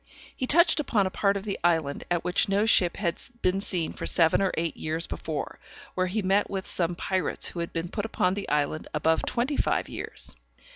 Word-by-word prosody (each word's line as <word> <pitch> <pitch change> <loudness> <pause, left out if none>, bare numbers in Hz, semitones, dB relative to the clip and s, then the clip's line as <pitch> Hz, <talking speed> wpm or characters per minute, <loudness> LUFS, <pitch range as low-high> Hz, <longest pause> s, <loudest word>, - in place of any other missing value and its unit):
He 255 - -3
touched 335 +2 +5
upon 225 -9 +1
a 185 - -2
part 200 0 +1
of 195 - -6
the 205 -2 -3
island 160 -5 +1
at 175 -1 0
which 180 +2 +1
no 200 +2 +2
ship 180 -6 +4
had 170 -5 -2 0.2
been 185 +2 +2
seen 175 -5 -1
for - - -5
seven 165 +1 +4
or 195 - +2
eight 165 -1 -1
years 160 +2 -2
before, 155 -2 -5 0.3
where 185 0 0
he 205 +3 -1
met 195 +2 +2
with 190 -1 -3
some 175 -1 0
pirates 185 +1 0
who 175 - -7
had 170 - -3
been 165 +1 -4
upon 205 -4 0
the 200 0 -5
island 150 +1 0
above 160 +2 +2
twenty 260 +5 -1
five - - +1
years. - - -5
185 Hz, 205 wpm, -27 LUFS, 165-200 Hz, 0.3 s, touched